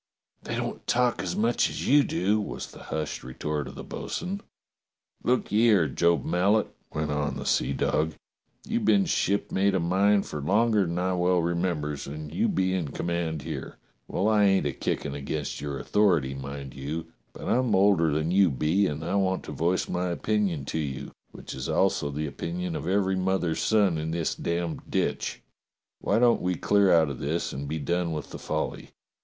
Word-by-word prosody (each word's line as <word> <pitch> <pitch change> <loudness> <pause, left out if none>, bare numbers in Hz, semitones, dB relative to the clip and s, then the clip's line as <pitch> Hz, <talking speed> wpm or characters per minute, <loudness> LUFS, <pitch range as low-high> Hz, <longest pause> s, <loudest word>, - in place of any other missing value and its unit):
"They - - -4
don't - - -4
talk 125 -1 +2
as 90 -2 -3
much 115 +3 +2
as - - -4
you 145 +2 +6
do," 105 -1 +1
was 100 - -6
the - - -12
hushed 75 -1 -3
retort 75 +3 -3
of - - -9
the - - -7
bo'sun. 190 +3 -4 0.8
"Look 125 +1 +1
ye 110 +3 +4
'ere, 95 -8 +4
Job 85 +5 +2
Mallet," 100 +5 +2 0.2
went 75 -1 -2
on 75 0 -1
the - - -5
seadog, 80 +3 +1 0.5
"you've 225 +1 0
been 200 -1 +4
shipmate 100 - +1
o' - - +2
mine 100 +4 +3
fer 75 - -6
longer 105 +4 +3
than 85 +1 -3
I 90 +1 +1
well 90 0 +2
remembers, 85 -4 -1
and 75 +1 -7
you 85 - +2
be 95 0 +1
in 90 -5 -1
command 80 -1 -2
here. - - -6 0.3
Well, 95 - 0
I 105 -2 +4
ain't 95 -5 +3
a 75 - +1
kickin' 70 - -2
against 70 +1 -4
your 70 -1 -3
authority, 85 -8 +2
mind 70 0 -7
you, 80 +4 -5 0.2
but - - -8
I'm 125 -4 +2
older 95 -4 +4
than 80 +3 0
you 95 -1 +5
be, 80 +9 +2
and 75 +1 -4
I - - -2
want 95 -2 +1
to - - -7
voice 85 +3 0
my 90 0 -1
opinion 90 -4 0
to 80 - -2
you, 70 -2 -4 0.2
which - - -9
is 65 0 -5
also 70 - +2
the 75 +2 -3
opinion 85 +4 -4
of - - -4
every 95 0 +2
mother's 90 -3 0
son 100 -5 +3
in 80 +1 -3
this 80 -1 -1
damned 85 -1 -2
ditch. - - -1 0.6
Why 100 - +1
don't 120 0 +4
we 90 0 0
clear 100 +3 +3
out 80 -4 +4
of 65 - -7
this 80 +4 -2
and 70 +2 -5
be 80 +3 -2
done 85 +3 -1
with 75 -2 -5
the - - -7
folly - - -3
85 Hz, 190 wpm, -27 LUFS, 75-100 Hz, 0.8 s, you